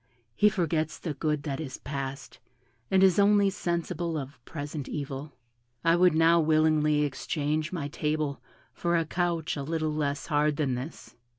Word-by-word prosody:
He 210 - +5
forgets 160 -5 -1
the 160 - -4
good 150 0 -1
that 140 -1 -3
is 140 -5 -5
past, 135 -1 -6 0.5
and 190 0 +4
is 190 0 +5
only 200 -1 +5
sensible 170 -2 -2
of 135 -3 -7
present 145 -2 -6
evil. 140 0 -5 0.5
I 165 0 +4
would 175 -2 +4
now 165 +1 +5
willingly 155 -1 +3
exchange 150 +2 -2
my 165 -6 -3
table 150 -1 -2 0.3
for 170 0 0
a 165 - +1
couch 170 -1 -1
a 145 - -4
little 155 +1 -1
less 145 -1 -1
hard 150 -1 +2
than 140 -4 0
this." 130 +6 -7
155 Hz, 160 wpm, -28 LUFS, 145-170 Hz, 0.5 s, He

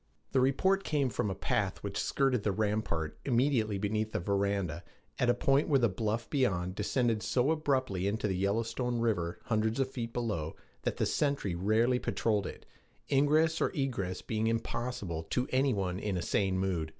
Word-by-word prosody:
The 135 - +3
report 190 +9 +2
came 145 -4 +1
from 105 - -1
a 95 - -3
path 95 - -1
which - - -4
skirted 135 -4 +1
the 105 - +1
rampart 105 -6 -1
immediately 120 -5 +2
beneath 110 +2 -1
the - - 0
veranda, 100 -3 -1 0.4
at 125 - +3
a 120 - +4
point 135 +3 +2
where 140 - +5
the 120 -3 +3
bluff 110 +4 -2
beyond 90 - 0
descended 115 +2 0
so 130 +6 +2
abruptly 130 - 0
into 105 +1 0
the 95 - -1
Yellowstone 115 +5 0
River, 100 -8 0
hundreds 110 +1 0
of 130 -1 0
feet 115 -3 -4
below, 105 -11 -2 0.3
that - - -2
the - - +1
sentry 140 - 0
rarely 110 +8 +2
patrolled 105 -6 0
it, - - -9 0.5
ingress 155 +4 +3
or - - +3
egress 120 -10 -2
being 110 0 -1
impossible 115 -6 -2
to 125 +1 0
any 135 +1 +3
one 95 -3 -1
in 100 -3 -2
a 85 - -2
sane 95 0 +1
mood. 90 -4 -1
110 Hz, 175 wpm, -31 LUFS, 100-130 Hz, 0.5 s, where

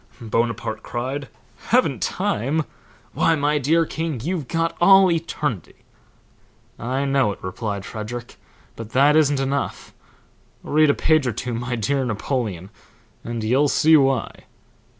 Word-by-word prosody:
Bonaparte 115 -1 -2
cried, 130 +4 -4 0.4
'Haven't - - +2
time? 140 +9 -1 0.5
Why, 165 - +2
my 150 0 +1
dear 165 +5 +2
king, 160 -4 -4
you've 160 +2 -3
got 165 +3 -1
all 195 0 +7
eternity.' 150 - -3 1.0
'I 130 +4 -2
know 135 -5 +2
it,' - - -17
replied 100 +1 -4
Frederick, 120 +3 -7 0.4
'but 115 -1 -9
that 140 +3 +5
isn't 145 -3 +3
enough. 135 +1 -3 0.7
Read 155 0 +3
a 145 - +3
page 155 -4 +2
or 120 - -1
two, 120 +3 -4
my 125 +2 -3
dear 135 +5 0
Napoleon, 110 -5 -3 0.5
and 120 -1 -4
you'll 130 +7 +3
see 160 +3 +4
why.'" 135 -5 +1
135 Hz, 130 wpm, -22 LUFS, 115-150 Hz, 1.0 s, all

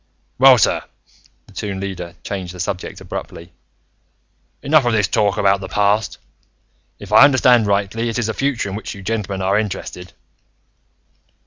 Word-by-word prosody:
"Well, 130 -1 +8
sir," 100 - +2 0.6
the - - -19
Toon 100 -2 -5
Leader 95 -3 -6
changed 95 -3 -6
the - - -11
subject 90 +1 -5
abruptly, 85 +1 -8 1.1
"enough 150 0 +4
of 120 -1 0
this 105 -3 +2
talk 105 -1 +1
about 100 -1 +2
the 95 - -7
past. 105 +1 0 0.8
If 105 -1 -12
I 110 - +8
understand 125 -5 +4
rightly, 100 +3 -1
it 115 - -3
is 120 - -1
the 110 - -2
future 135 -5 -1
in - - -6
which 110 - -6
you 100 - -11
gentlemen 100 -3 -3
are 100 +2 +2
interested." 90 -4 -6
105 Hz, 155 wpm, -19 LUFS, 95-115 Hz, 1.1 s, Well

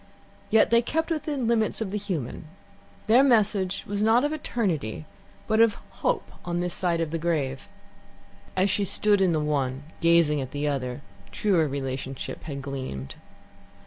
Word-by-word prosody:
Yet 220 +1 +4
they 235 0 +6
kept 320 +7 -1
within 295 -5 -1
limits 225 -2 +1
of 215 -4 -3
the 210 - -1
human. 170 - -4 0.6
Their 235 +4 +6
message 210 -7 +2
was 205 0 -2
not 225 +4 +4
of 295 +1 0
eternity, 180 - -2 0.4
but 220 0 +2
of 230 -2 +5 0.3
hope - - 0
on 175 0 -2
this 175 0 -2
side 175 -2 0
of 165 -2 -1
the 165 - -2
grave. 145 -6 -2 0.9
As 190 +2 +3
she 205 - +1
stood 205 +1 +2
in 185 -2 +4
the 160 - +1
one, 140 -3 -1 0.2
gazing 165 -3 +4
at 130 - -5
the 145 +1 -1
other, 130 -2 -2 0.3
truer 180 -7 +2
relationship 135 -1 -4
had 140 -3 -5
gleamed. 130 - -5
175 Hz, 160 wpm, -26 LUFS, 140-220 Hz, 0.9 s, they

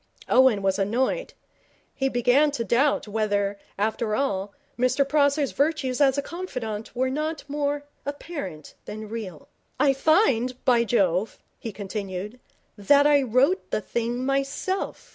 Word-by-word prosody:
Owen 250 -6 +4
was 195 0 +1
annoyed. 250 - -1 0.6
He 270 -1 0
began 250 +4 +3
to 230 - -1
doubt 240 +4 +2
whether, 205 -2 -1 0.2
after 215 +1 0
all, 200 -7 -1 0.2
Mr 255 +3 +2
Prosser's 285 -1 +2
virtues 285 -3 0
as 270 -1 +4
a 280 - 0
confidant 250 - -6
were 260 +1 0
not 305 +2 -3
more 290 0 -2 0.2
apparent 285 - -6
than 215 0 -7
real. 200 -9 -7 0.3
'I 280 -2 +4
find, 265 - +2
by 240 -2 +4
Jove,' 195 -3 +1 0.2
he 225 - -5
continued, 200 +2 -6 0.4
'that 280 +8 +4
I 290 -1 +5
wrote 265 - +2
the - - 0
thing 235 +4 -2
myself.' 275 +8 -2
250 Hz, 135 wpm, -25 LUFS, 215-285 Hz, 0.6 s, I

